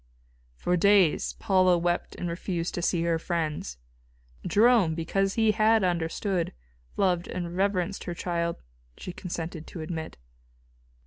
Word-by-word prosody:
For 180 - 0
days 195 -3 +4
Paula 185 -2 +3
wept 175 +1 -1
and 175 - -4
refused 170 0 -3
to 175 - -3
see 170 -1 +1
her 165 -1 +1
friends. 155 - -3 0.7
Jerome, 215 -7 +4
because 195 +4 0
he 220 -1 +4
had 220 0 +3
understood, 175 +1 -1 0.4
loved 180 -3 +1
and 175 -1 -5
reverenced 195 0 0
her 175 - -4
child, 170 - -2 0.3
she 180 - -7
consented 165 -3 -6
to 170 - -7
admit. 160 0 -5
175 Hz, 130 wpm, -27 LUFS, 170-195 Hz, 0.7 s, days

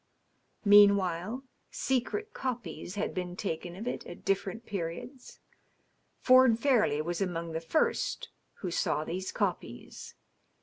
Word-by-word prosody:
Meanwhile, 200 +2 +5 0.3
secret 340 - -2
copies 225 -8 -5
had 205 - -2
been 180 -2 -4
taken 175 -2 -4
of 210 +5 -7
it - - -3
at 175 - -11
different 195 +3 -1
periods. 200 - -6 0.8
Ford 255 -3 +6
Fairleigh 230 - +2
was 175 +2 -3
among 170 -3 -2
the 160 0 -3
first 240 - 0 0.3
who 185 - -3
saw 155 - 0
these 185 +4 -4
copies. - - -4
195 Hz, 120 wpm, -30 LUFS, 175-235 Hz, 0.8 s, Ford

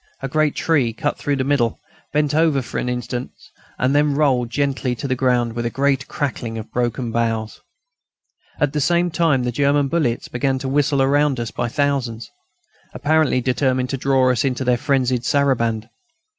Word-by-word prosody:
A - - -1
great 155 +2 +1
tree, 140 -9 +1
cut 145 +6 -2
through 145 - 0
the 135 - -1
middle, 130 -5 +1 0.3
bent 150 -1 +1
over 155 -4 +2
for - - -4
an 125 - -2
instant 125 0 -3 0.5
and 130 +2 +1
then 145 0 +2
rolled 130 -5 +2
gently 135 -1 -1
to 130 - -5
the 130 - 0
ground 125 -2 +1
with 120 0 -3
a 120 - -1
great 135 +1 0
crackling 120 -5 -3
of 110 - -8
broken 120 0 -1
boughs. 115 -1 -2 1.0
At 145 -2 +1
the 150 - 0
same 175 +3 +2
time 155 -6 +2
the 125 - -1
German 140 +2 +2
bullets 130 -8 0
began 130 +2 -1
to 130 - -4
whistle 140 0 +2
round 145 -1 +2
us 115 -2 -3
by - - -2
thousands, 130 -4 -1 0.6
apparently 155 -4 +2
determined 130 0 0
to 135 - -1
draw 130 -1 +2
us 120 - 0
into 130 -1 -1
their 125 -1 +3
frenzied 125 -1 0
saraband. 115 -6 +1
135 Hz, 180 wpm, -20 LUFS, 120-145 Hz, 1.0 s, their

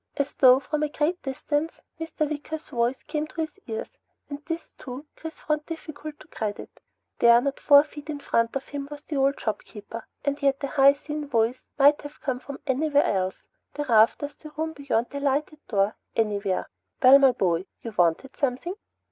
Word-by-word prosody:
As 280 0 -1
though 255 -1 +7
from 300 +2 -3
a 300 - +1
great 310 +4 -1
distance 290 +4 -2 0.2
Mr. 325 -1 -2
Wicker's 305 +1 -5
voice 245 -1 0
came 305 0 -3
to 325 - -5
his 315 +4 -5
ears, 455 +3 -6 0.3
and 285 +1 -6
this 330 0 -4
too, 260 +3 -9
Chris 320 0 -8
found 300 0 -1
difficult 310 -2 -7
to - - -15
credit. 210 -2 -5 0.4
There, 235 0 +7
not 275 +2 -2
four 285 0 +7
feet 300 0 -11
in 295 -1 -3
front 230 -3 0
of 270 - -4
him 285 -1 -5
was 295 0 -9
the 300 - -4
old 275 +1 +2
shopkeeper, 220 +1 -5 0.2
and 285 +1 -1
yet 275 -1 +2
the 280 - -2
high 275 -1 +6
thin 300 +1 -5
voice 235 -1 +1 0.2
might 290 +1 +6
have 290 0 -10
come 255 -2 -2
from 280 +1 -9
anywhere 285 +1 +2
else 190 -1 -1 0.3
the 295 - -2
rafters, 235 +4 +3
the 305 - -11
room 320 0 -2
beyond 280 -6 0
the 280 - -4
lighted 290 +2 0
door; 200 0 +1 0.2
anywhere. 205 -4 0 0.4
"Well, 265 +2 +9
my 270 -2 +6
boy? 180 -3 0 0.2
You 230 - -5
wanted 175 +10 +1
something?" 275 +6 -1
280 Hz, 190 wpm, -26 LUFS, 245-300 Hz, 0.4 s, Well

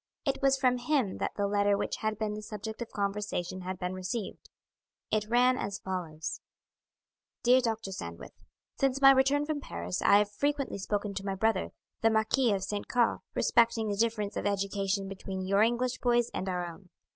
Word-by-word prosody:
It 275 -1 0
was 270 0 +4
from 250 -2 +2
him 245 -6 0
that - - -2
the 205 - 0
letter 205 0 +2
which - - -2
had 215 -1 -2
been 215 -1 -2
the 210 - -5
subject 215 +1 -7
of 235 - -4
conversation 200 -3 -2
had 185 +1 -4
been 180 0 -3
received. 185 +4 -5 0.6
It 215 0 0
ran 250 +2 +4
as 200 0 -3
follows: 170 -4 -5 1.0
"Dear 250 +2 +6
Doctor 225 -4 -2
Sandwith, 85 - -7 0.5
Since 270 0 +2
my 270 0 +9
return 270 +2 +3
from 300 -1 -2
Paris 85 - -4
I 200 - +6
have 205 0 +1
frequently 280 0 -1
spoken 205 +1 -2
to 195 0 -5
my 195 - -1
brother, 220 +3 +1 0.3
the 225 - +5
Marquis 220 +3 +2
of 195 -2 0
St. 205 0 -3
Caux, 240 -2 +2 0.2
respecting 230 -2 +3
the 205 - 0
difference 215 -1 0
of - - -1
education 195 -1 -1
between 190 -1 -5
your 200 +2 +3
English 240 +3 +1
boys 240 -1 +2
and 190 - -3
our 180 -1 -1
own. 175 +2 -10
210 Hz, 185 wpm, -30 LUFS, 195-240 Hz, 1.0 s, my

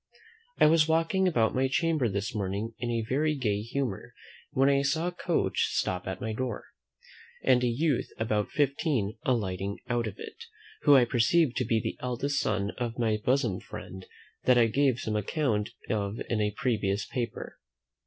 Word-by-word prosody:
I - - +6
was 155 0 +5
walking 165 +4 +2
about 115 -11 +2
my 130 +1 +2
chamber 155 -2 +1
this 100 +2 -3
morning 105 +2 -3
in 120 0 -3
a 115 -2 -1
very 150 +4 +1
gay 105 -7 0
humour, 120 -2 -4 0.3
when 135 +1 +2
I 140 0 +4
saw 150 +4 0
a 180 - -1
coach 175 - 0
stop 90 0 -1
at 95 -1 -4
my 110 0 -3
door, 120 -1 -3 0.8
and 125 -1 +4
a - - +3
youth 135 +3 0
about 105 -2 0
fifteen 140 -6 0
alighting 100 -5 -1
out 120 -2 0
of 100 - -6
it, - - -9 0.4
who 145 - +6
I 130 -2 +6
perceived 125 +4 +2
to 125 - +1
be 115 0 +2
the - - -4
eldest 130 +3 -1
son 105 -1 0
of 120 -1 -3
my 110 -3 +1
bosom 115 -3 +1
friend, 95 0 -9 0.4
that 125 -1 +5
I 120 - +6
gave 130 +2 +2
some 110 -1 -2
account 105 - 0 0.2
of 105 0 -2
in 110 -2 +1
a 105 - +2
previous 105 -5 0
paper. 120 -4 -5
120 Hz, 175 wpm, -28 LUFS, 105-140 Hz, 0.8 s, I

